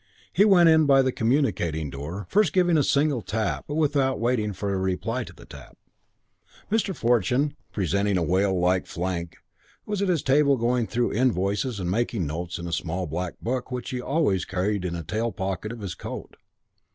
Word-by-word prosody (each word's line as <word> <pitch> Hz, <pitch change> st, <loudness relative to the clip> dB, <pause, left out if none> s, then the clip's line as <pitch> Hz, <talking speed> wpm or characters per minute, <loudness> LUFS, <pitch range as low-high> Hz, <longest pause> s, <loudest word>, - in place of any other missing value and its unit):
He 200 Hz, -, +5 dB
went 180 Hz, -5 st, +6 dB
in 160 Hz, -2 st, +5 dB
by 135 Hz, -1 st, +6 dB
the 130 Hz, -, +1 dB
communicating 105 Hz, -, 0 dB
door, 80 Hz, +9 st, -6 dB
first 200 Hz, -6 st, +2 dB
giving 180 Hz, -2 st, +3 dB
a 155 Hz, -, +4 dB
single 140 Hz, -2 st, +2 dB
tap 110 Hz, 0 st, -2 dB
but 145 Hz, -, -4 dB
without 140 Hz, -4 st, +1 dB
waiting 115 Hz, -3 st, 0 dB
for 100 Hz, +1 st, -3 dB
a -, -, 0 dB
reply 95 Hz, -1 st, -1 dB
to -, -, -11 dB
the -, -, -15 dB
tap. -, -, -13 dB, 0.9 s
Mr. 210 Hz, -4 st, +1 dB
Fortune, 125 Hz, +4 st, +1 dB, 0.2 s
presenting 100 Hz, +1 st, 0 dB
a 90 Hz, -, +1 dB
whale 95 Hz, +3 st, +1 dB
like 90 Hz, +1 st, +1 dB
flank, 85 Hz, -1 st, -4 dB, 0.5 s
was 205 Hz, -2 st, -2 dB
at 200 Hz, -, +1 dB
his 170 Hz, -5 st, +1 dB
table 140 Hz, 0 st, +4 dB
going 120 Hz, 0 st, +1 dB
through 120 Hz, +1 st, 0 dB
invoices 105 Hz, 0 st, 0 dB
and 90 Hz, -1 st, -2 dB
making 115 Hz, -3 st, 0 dB
notes 85 Hz, +4 st, -4 dB
in 85 Hz, -, -6 dB
a 85 Hz, -, -5 dB
small 90 Hz, +2 st, -2 dB
black 90 Hz, +3 st, -4 dB
book 125 Hz, +1 st, -2 dB
which 125 Hz, -1 st, -4 dB
he 130 Hz, -, -2 dB
carried 125 Hz, -, -8 dB
always 140 Hz, -, +1 dB
in 90 Hz, -1 st, -1 dB
a 85 Hz, -, -5 dB
tail 110 Hz, +8 st, -2 dB
pocket 95 Hz, +2 st, -4 dB
of 115 Hz, -1 st, -8 dB
his 95 Hz, -4 st, -4 dB
jacket. -, -, -8 dB
110 Hz, 190 wpm, -25 LUFS, 90-135 Hz, 0.9 s, went